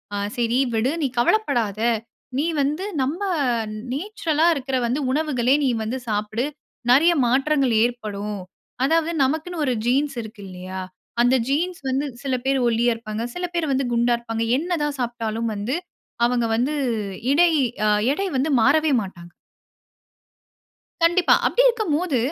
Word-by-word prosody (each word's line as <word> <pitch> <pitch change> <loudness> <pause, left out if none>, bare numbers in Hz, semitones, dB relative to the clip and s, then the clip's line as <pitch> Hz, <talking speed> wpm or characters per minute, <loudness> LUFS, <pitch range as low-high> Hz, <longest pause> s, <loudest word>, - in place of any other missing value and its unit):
ஆ - - -1 0.2
சரி 240 +2 +1 0.2
விடு! 240 +5 +1
நீ - - +3
கவலைப்படாதே! 235 - +1 0.5
நீ 295 - +1 0.2
வந்து 300 +7 -1 0.2
நம்ப 315 +9 -3 0.7
நேச்சுரலா 325 -2 0
இருக்கிற 270 -2 -3
வந்து 250 +5 0
உணவுகளே 275 -3 +2
நீ - - +3
வந்து 240 +4 -3
சாப்பிடு. 215 +4 -1 0.5
நிறைய 330 +7 +6
மாற்றங்கள் 270 0 +2
ஏற்படும். 210 -4 -3 0.4
அதாவது 325 +3 +2
நமக்குன்னு 315 +4 -1
ஒரு 255 - +1
ஜீன்ஸ் 270 +2 +1
இருக்கு 220 -1 -10
இல்லயா! 185 +1 -7 0.4
அந்த 245 +2 +4
ஜீன்ஸ் 335 +5 -1
வந்து 270 +3 0 0.2
சில 265 -2 0
பேரு 270 0 +2
ஒல்லியா 235 +1 +2
இருப்பாங்க. 225 0 -5
சில 360 0 -2
பேர் 315 -4 0
வந்து 265 0 0
குண்டா 240 +1 +3
இருப்பாங்க. 225 -1 -3 0.2
என்ன 350 +1 -1
தான் 290 -2 -2
சாப்ட்டாலும் 230 -2 -2
வந்து 215 +8 -2 0.5
அவங்க 240 -1 +1
வந்து 255 +6 0 0.6
இடை 340 +3 +5 0.4
அ - - +4 0.2
எடை 395 +5 -2
வந்து 285 +4 +1
மாறவே 305 +4 +4
மாட்டாங்க. 175 -3 -9 1.7
கண்டிப்பா. 345 +1 +5
அப்படி - - +3
இருக்கம்போது, 355 - 0
260 Hz, 135 wpm, -23 LUFS, 230-310 Hz, 1.7 s, நிறைய